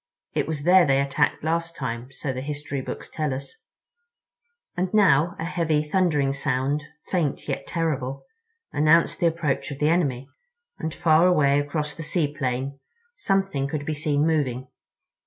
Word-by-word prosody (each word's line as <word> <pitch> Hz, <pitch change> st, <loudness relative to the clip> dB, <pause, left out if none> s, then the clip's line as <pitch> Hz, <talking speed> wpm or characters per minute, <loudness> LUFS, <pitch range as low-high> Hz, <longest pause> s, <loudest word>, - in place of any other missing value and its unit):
It -, -, 0 dB
was 155 Hz, -3 st, -3 dB
there 180 Hz, +2 st, +6 dB
they 135 Hz, 0 st, +3 dB
attacked 140 Hz, +2 st, +1 dB
last 165 Hz, +1 st, -1 dB
time, 125 Hz, -2 st, -5 dB
so 130 Hz, 0 st, -4 dB
the 130 Hz, -, -4 dB
history 145 Hz, -1 st, -4 dB
books -, -, -6 dB
tell 155 Hz, -2 st, -2 dB
us." 135 Hz, 0 st, -8 dB, 1.2 s
And 180 Hz, +1 st, -1 dB
now 175 Hz, -3 st, +4 dB
a 165 Hz, -, -4 dB
heavy, 160 Hz, -3 st, 0 dB
thundering 150 Hz, -6 st, +2 dB
sound, 140 Hz, +2 st, 0 dB, 0.3 s
faint 165 Hz, -7 st, -1 dB
yet -, -, -3 dB
terrible, 140 Hz, -6 st, -2 dB, 0.5 s
announced 155 Hz, +3 st, +3 dB
the 170 Hz, -, +3 dB
approach 145 Hz, -5 st, -1 dB
of 140 Hz, -, -6 dB
the 150 Hz, +1 st, +2 dB
enemy—and 170 Hz, -, -3 dB
far 165 Hz, 0 st, +4 dB
away 145 Hz, -5 st, +4 dB
across 150 Hz, +1 st, -2 dB
the -, -, -8 dB
sea 155 Hz, -2 st, -1 dB
plain 135 Hz, 0 st, -2 dB, 0.3 s
something 195 Hz, -, 0 dB
could 145 Hz, 0 st, -4 dB
be 155 Hz, -, -1 dB
seen 150 Hz, 0 st, +1 dB
moving. 130 Hz, -6 st, 0 dB
150 Hz, 155 wpm, -25 LUFS, 140-165 Hz, 1.2 s, there